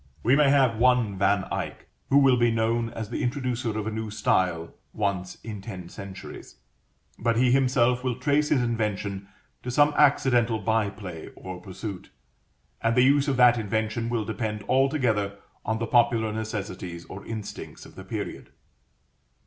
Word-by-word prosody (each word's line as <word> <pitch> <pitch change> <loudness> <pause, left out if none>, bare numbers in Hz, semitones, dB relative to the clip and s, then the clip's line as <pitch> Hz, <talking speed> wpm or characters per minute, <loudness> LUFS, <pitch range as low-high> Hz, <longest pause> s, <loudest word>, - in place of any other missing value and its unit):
We 125 +4 +4
may 145 -1 +5
have 130 -5 +3
one 125 -4 +3
Van 100 0 +3
Eyck, - - -4 0.2
who 140 - +5
will 135 -2 +6
be 120 -1 +3
known 115 +1 0
as 110 -1 -7
the - - -2
introducer 125 -3 -2
of 110 - -3
a 110 - -2
new 110 0 -4
style 90 -5 0 0.2
once 100 -3 -2
in 105 -3 -6
ten 95 -4 -8
centuries, 95 -1 -10 0.6
but 115 -1 +1
he 125 0 +4
himself 125 -1 +3
will 125 -2 -1
trace 145 +4 +1
his 130 -4 +3
invention 105 -4 -2 0.3
to 125 - -6
some 145 +4 +4
accidental 125 -5 +3
bye 110 0 +1
play 90 -6 -8
or 90 -1 -8
pursuit; 95 0 -7 0.7
and 115 0 +1
the 125 - +5
use 140 +2 +4
of 135 -3 0
that 120 -1 +6
invention 110 +2 -2
will 115 -3 -1
depend 110 -1 -3
altogether 125 -7 +1 0.3
on 110 +1 -1
the 115 - -2
popular 115 -2 +2
necessities 100 -6 -5
or 100 +1 -9
instincts 110 -2 -7
of - - -14
the - - -10
period. - - -6
115 Hz, 165 wpm, -26 LUFS, 100-125 Hz, 0.7 s, will